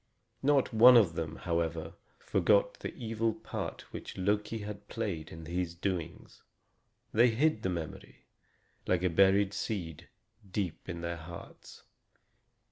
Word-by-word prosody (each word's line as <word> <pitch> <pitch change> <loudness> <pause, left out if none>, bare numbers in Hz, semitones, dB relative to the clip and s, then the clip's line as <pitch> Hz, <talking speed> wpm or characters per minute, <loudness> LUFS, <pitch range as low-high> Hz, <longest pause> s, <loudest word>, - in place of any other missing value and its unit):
Not 140 -3 +3
one 120 +3 +9
of 100 -8 +4
them, 80 -1 -4
however, 85 -1 -2 0.2
forgot 100 -1 +2
the - - -4
evil 115 -1 -1
part - - -5
which - - -7
Loki 105 +4 0
had 105 0 -7
played 95 -10 -4
in 80 0 -9
these 85 +1 -3
doings. 85 -2 -4 0.7
They 120 +3 +6
hid 125 +1 +2
the 95 - -1
memory, 85 -3 -6 0.6
like 90 -1 +2
a 90 - +2
buried 100 +2 +4
seed, 85 -10 -4 0.4
deep 95 -3 -3
in 85 -1 -4
their 85 0 -3
hearts. 85 +1 -11
95 Hz, 130 wpm, -31 LUFS, 85-110 Hz, 0.7 s, one